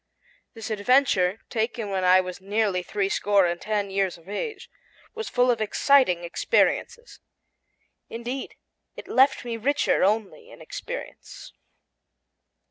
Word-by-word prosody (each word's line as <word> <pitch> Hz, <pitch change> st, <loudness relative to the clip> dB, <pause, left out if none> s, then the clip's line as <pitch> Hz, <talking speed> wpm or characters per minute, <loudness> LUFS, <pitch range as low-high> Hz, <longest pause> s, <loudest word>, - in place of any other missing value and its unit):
This 225 Hz, 0 st, -7 dB
adventure, 215 Hz, -3 st, +2 dB
taken 225 Hz, -2 st, -2 dB
when 190 Hz, -1 st, -1 dB
I 185 Hz, +1 st, +6 dB
was 185 Hz, +1 st, -8 dB
nearly 200 Hz, -1 st, 0 dB
three 195 Hz, +2 st, -2 dB
score 200 Hz, -1 st, +2 dB
and 175 Hz, 0 st, -2 dB
ten 205 Hz, -2 st, -2 dB
years 190 Hz, -2 st, -1 dB
of 165 Hz, +1 st, -21 dB
age, 210 Hz, -, -5 dB, 0.5 s
was 445 Hz, -1 st, -5 dB
full 250 Hz, 0 st, +3 dB
of 230 Hz, -2 st, -2 dB
exciting 215 Hz, -5 st, +3 dB
experiences. 470 Hz, -, 0 dB, 0.9 s
Indeed, 240 Hz, +3 st, -6 dB, 0.4 s
it -, -, -10 dB
left 265 Hz, -1 st, +3 dB
me 235 Hz, -1 st, -4 dB
richer 280 Hz, +1 st, +1 dB
only 220 Hz, -, -1 dB
in -, -, -14 dB
experience. -, -, -9 dB
215 Hz, 125 wpm, -25 LUFS, 195-255 Hz, 0.9 s, I